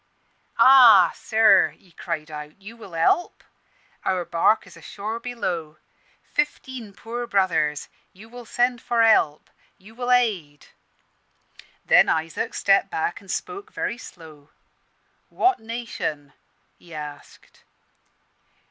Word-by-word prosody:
"'Ah, 230 Hz, -9 st, +7 dB
sir,' 220 Hz, -3 st, +3 dB
he 185 Hz, -, -25 dB
cried, 155 Hz, -2 st, -7 dB
'you 210 Hz, +4 st, -12 dB
will 215 Hz, -6 st, -13 dB
help? 165 Hz, -, 0 dB, 0.6 s
Our 185 Hz, -2 st, -1 dB
barque 170 Hz, +7 st, +1 dB
is -, -, -16 dB
ashore 215 Hz, +3 st, -7 dB
below 175 Hz, -11 st, -5 dB, 0.5 s
fifteen 260 Hz, -6 st, -4 dB
poor 235 Hz, +4 st, -6 dB
brothers! 165 Hz, -8 st, 0 dB, 0.2 s
You 210 Hz, +4 st, -15 dB
will 240 Hz, 0 st, -12 dB
send 245 Hz, +1 st, 0 dB
for 235 Hz, -1 st, +1 dB
help? 155 Hz, -9 st, +2 dB, 0.3 s
you 205 Hz, +4 st, -17 dB
will 245 Hz, +1 st, -3 dB
aid?' 195 Hz, -13 st, 0 dB, 1.2 s
"Then -, -, +5 dB
Isaac 165 Hz, +8 st, -2 dB
stepped 195 Hz, 0 st, +2 dB
back, 165 Hz, +2 st, -3 dB
and 195 Hz, -, -18 dB
spoke 410 Hz, -, -5 dB
very 235 Hz, -, -4 dB
slow 155 Hz, -, -14 dB, 0.8 s
'What 375 Hz, +1 st, +1 dB
nation?' 220 Hz, -, -6 dB, 0.5 s
he 170 Hz, -2 st, -14 dB
asked. 150 Hz, -1 st, -11 dB
200 Hz, 110 wpm, -23 LUFS, 160-235 Hz, 1.2 s, Ah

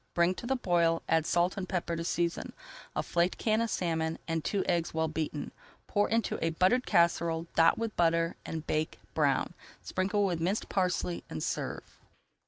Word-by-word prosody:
Bring 170 Hz, +1 st, +4 dB
to 235 Hz, -, -7 dB
the 265 Hz, -, +2 dB
boil, 170 Hz, -7 st, +2 dB
[Page -, -, -35 dB
304] 165 Hz, -, +5 dB
add 160 Hz, -, -7 dB
salt 175 Hz, +2 st, +2 dB
and 185 Hz, -2 st, -4 dB
pepper 175 Hz, -2 st, -1 dB
to 165 Hz, -, -3 dB
season, 170 Hz, 0 st, -1 dB, 0.4 s
a -, -, 0 dB
flaked 175 Hz, +1 st, +1 dB
can 220 Hz, 0 st, +1 dB
of 230 Hz, -, 0 dB
salmon, 165 Hz, -4 st, -1 dB
and 165 Hz, -1 st, -1 dB
two 200 Hz, -2 st, 0 dB
eggs 170 Hz, -2 st, 0 dB
well 160 Hz, 0 st, +1 dB
beaten. 155 Hz, -1 st, -3 dB, 0.3 s
Pour 205 Hz, 0 st, +1 dB
into 225 Hz, 0 st, 0 dB
a 165 Hz, -, +2 dB
buttered 185 Hz, +10 st, +2 dB
casserole, 170 Hz, -1 st, +2 dB
dot 165 Hz, 0 st, +5 dB
with 230 Hz, -1 st, -3 dB
butter, 165 Hz, 0 st, +2 dB
and 160 Hz, -1 st, -5 dB
bake 155 Hz, +1 st, -1 dB, 0.2 s
brown. -, -, +1 dB, 0.3 s
Sprinkle 200 Hz, +2 st, 0 dB
with 175 Hz, -4 st, -1 dB
minced 190 Hz, +6 st, -1 dB
parsley 180 Hz, -2 st, 0 dB
and 80 Hz, -, -4 dB
serve. -, -, -4 dB
170 Hz, 190 wpm, -30 LUFS, 165-190 Hz, 0.4 s, 304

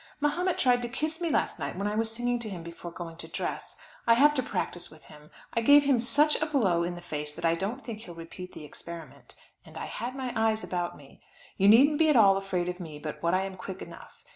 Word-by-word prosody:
Mahomet 345 Hz, +5 st, +1 dB
tried 245 Hz, -2 st, +3 dB
to 240 Hz, -, -3 dB
kiss 310 Hz, +6 st, -2 dB
me 340 Hz, -, 0 dB
last -, -, 0 dB
night -, -, -4 dB
when 200 Hz, -, -2 dB
I 210 Hz, -, 0 dB
was 225 Hz, +1 st, 0 dB
singing 240 Hz, +1 st, -1 dB
to 225 Hz, -2 st, -3 dB
him 180 Hz, -4 st, -6 dB
before 170 Hz, +1 st, -8 dB
going 165 Hz, -1 st, -8 dB
to -, -, -6 dB
dress. -, -, -5 dB, 0.3 s
I 230 Hz, -, +7 dB
have 295 Hz, +4 st, +6 dB
to 275 Hz, -, +1 dB
practise 175 Hz, -7 st, -3 dB
with 155 Hz, -, -17 dB
him. 150 Hz, 0 st, -15 dB, 0.2 s
I 230 Hz, -, +1 dB
gave 285 Hz, +5 st, +7 dB
him 275 Hz, -4 st, +3 dB
such 295 Hz, +6 st, +3 dB
a 310 Hz, -, +1 dB
blow 205 Hz, -, +2 dB
in 175 Hz, +1 st, -2 dB
the 175 Hz, -, -9 dB
face 150 Hz, -2 st, -4 dB
that -, -, -4 dB
I 165 Hz, -, +4 dB
don't 205 Hz, +10 st, -3 dB
think 225 Hz, -3 st, -6 dB
he'll 175 Hz, -6 st, -10 dB
repeat 175 Hz, +2 st, -9 dB
the 155 Hz, -, -9 dB
experiment, 165 Hz, +1 st, -10 dB, 0.3 s
and -, -, -13 dB
I -, -, -4 dB
had 250 Hz, +2 st, -5 dB
my 260 Hz, -2 st, -4 dB
eyes 220 Hz, 0 st, +1 dB
about 175 Hz, -1 st, -3 dB
me. 140 Hz, -2 st, -17 dB, 0.3 s
You 195 Hz, -, +3 dB
needn't 275 Hz, +8 st, +7 dB
be 320 Hz, -1 st, +5 dB
at 300 Hz, -, +4 dB
all 200 Hz, -4 st, +7 dB
afraid 190 Hz, -3 st, -1 dB
of 180 Hz, +1 st, -4 dB
me 160 Hz, -4 st, -7 dB
but 150 Hz, 0 st, -6 dB
what 170 Hz, +2 st, +2 dB
I 190 Hz, -, +1 dB
am 190 Hz, -1 st, -6 dB
quick 190 Hz, 0 st, -7 dB
enough. -, -, -12 dB
205 Hz, 255 wpm, -28 LUFS, 175-255 Hz, 0.3 s, I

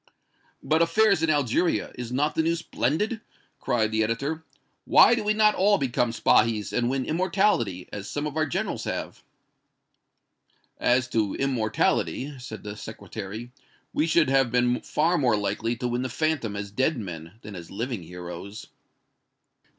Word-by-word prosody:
"But 160 Hz, +1 st, +2 dB
affairs 200 Hz, +1 st, +4 dB
in 165 Hz, -, +1 dB
Algeria 145 Hz, +3 st, +1 dB
is 120 Hz, -1 st, -6 dB
not 145 Hz, +4 st, +1 dB
the -, -, +1 dB
news 165 Hz, +1 st, +1 dB
splendid!" 205 Hz, -, -1 dB, 0.4 s
cried 115 Hz, -4 st, 0 dB
the 110 Hz, 0 st, +2 dB
editor. 140 Hz, +9 st, -2 dB, 0.4 s
"Why -, -, +7 dB
did 225 Hz, -3 st, -1 dB
we 210 Hz, -, +3 dB
not 215 Hz, 0 st, +5 dB
all 200 Hz, +2 st, +3 dB
become 125 Hz, -3 st, 0 dB
Spahis 110 Hz, -2 st, +2 dB
and 120 Hz, 0 st, +1 dB
win 130 Hz, 0 st, -1 dB
immortality, 170 Hz, -, +1 dB
as 100 Hz, 0 st, -6 dB
some 145 Hz, 0 st, -3 dB
of 150 Hz, -1 st, -4 dB
our 155 Hz, 0 st, +1 dB
generals -, -, -2 dB
have?" -, -, -4 dB, 1.6 s
"As 125 Hz, 0 st, +2 dB
to 110 Hz, -4 st, 0 dB
immortality," 130 Hz, +2 st, 0 dB
said 110 Hz, -4 st, -8 dB
the 105 Hz, 0 st, -6 dB
Secretary, 105 Hz, +2 st, -7 dB, 0.4 s
"we 155 Hz, -, +1 dB
should 160 Hz, -3 st, +3 dB
have 135 Hz, -3 st, +3 dB
been 125 Hz, 0 st, +2 dB
far 170 Hz, +3 st, +1 dB
more 120 Hz, -6 st, +3 dB
likely 105 Hz, +3 st, -1 dB
to 125 Hz, +1 st, -3 dB
win 120 Hz, +1 st, -1 dB
the 130 Hz, -, -2 dB
phantom 145 Hz, -6 st, -1 dB
as 100 Hz, 0 st, -5 dB
dead 130 Hz, +7 st, +1 dB
men 85 Hz, -5 st, -7 dB
than 105 Hz, -1 st, -8 dB
as 85 Hz, -2 st, -9 dB
living 115 Hz, +1 st, -4 dB
heroes." 90 Hz, +4 st, -8 dB
125 Hz, 160 wpm, -26 LUFS, 110-155 Hz, 1.6 s, Why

